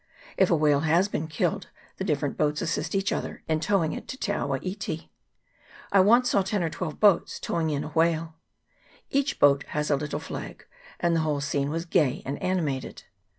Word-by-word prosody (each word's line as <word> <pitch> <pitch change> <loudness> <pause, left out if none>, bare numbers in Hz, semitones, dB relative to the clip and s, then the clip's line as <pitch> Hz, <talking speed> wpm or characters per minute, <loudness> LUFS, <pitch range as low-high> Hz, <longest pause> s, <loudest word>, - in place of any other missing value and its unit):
If 190 - +3
a 170 - +4
whale 150 -2 +3
has 165 +5 +3
been 160 -6 -3
killed, 185 +3 -1 0.3
the - - -3
different 145 -6 -1
boats 150 +1 0
assist 165 - -2
each 195 0 +1
other - - -4
in 155 -1 +1
towing 165 -2 +1
it - - -7
to 260 - -6
Te 210 - -2
awa 140 -8 -1
iti. 185 -4 -5 0.8
I 200 - +5
once 235 +6 +5
saw 200 - +4
ten 190 0 -1
or 165 - -1
twelve 160 -4 -5
boats 205 -5 +3
towing 165 -2 -1
in 145 -2 -1
a - - -6
whale. 165 0 +1 0.8
Each 275 0 +1
boat 140 -1 +5
had 150 0 -2
a - - +5
little 145 +1 -3
flag, 160 - -7 0.3
and 170 -1 +2
the - - +2
whole 155 -2 0
scene 140 0 -1
was 165 +2 -3
gay 155 -7 +1
and 140 +2 -4
animated. 155 -8 -2
160 Hz, 195 wpm, -26 LUFS, 150-190 Hz, 0.8 s, I